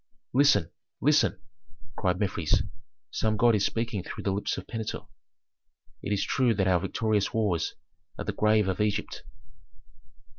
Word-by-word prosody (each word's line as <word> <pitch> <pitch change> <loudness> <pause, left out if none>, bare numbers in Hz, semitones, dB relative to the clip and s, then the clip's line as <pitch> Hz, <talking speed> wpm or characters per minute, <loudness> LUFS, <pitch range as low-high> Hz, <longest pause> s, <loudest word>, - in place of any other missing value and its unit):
"Listen! 120 - +4 0.3
listen!" 150 +2 +3 0.6
cried 90 -3 0
Mefres, 95 -6 +1 0.5
"some 110 -1 0
god 120 +2 +5
is 105 -2 +2
speaking 115 -3 -1
through - - -7
the 100 - 0
lips 100 +2 -1
of - - -6
Pentuer. 110 -2 -5 1.0
It - - -4
is 100 -1 +1
true 125 -4 +2
that 95 -1 +1
our 90 -2 +4
victorious 105 +3 0
wars 100 -7 0 0.4
are - - -5
the - - -2
grave 105 -1 +3
of 95 +2 -1
Egypt." 105 0 -1
105 Hz, 145 wpm, -28 LUFS, 95-110 Hz, 1.0 s, god